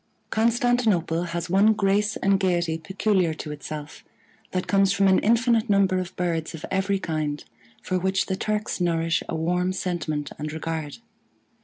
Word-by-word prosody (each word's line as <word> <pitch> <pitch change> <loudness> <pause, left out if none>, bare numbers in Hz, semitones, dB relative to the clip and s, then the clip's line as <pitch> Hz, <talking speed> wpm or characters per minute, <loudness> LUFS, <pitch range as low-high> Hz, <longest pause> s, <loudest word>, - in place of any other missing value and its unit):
Constantinople 225 -7 +2
has 170 0 -4
one 200 +5 +4
grace 205 +1 +1
and 195 0 +2
gayety 175 -4 0
peculiar 190 -1 0
to 150 - -6
itself, 150 0 -7 0.5
that 185 -1 -2
comes 195 -1 +3
from 195 0 +3
an 190 - +5
infinite 230 0 +2
number 195 -2 +3
of 185 +1 -6
birds 165 -2 -2
of 155 - -7
every 195 +1 +1
kind, 155 -5 -3 0.4
for 185 0 -1
which 190 +1 +1
the 190 - -2
Turks 210 -1 -2
nourish 165 -1 +1
a - - -2
warm 180 +3 0
sentiment 155 -6 -3
and 150 0 -4
regard. 160 -1 -4
185 Hz, 155 wpm, -25 LUFS, 165-200 Hz, 0.5 s, an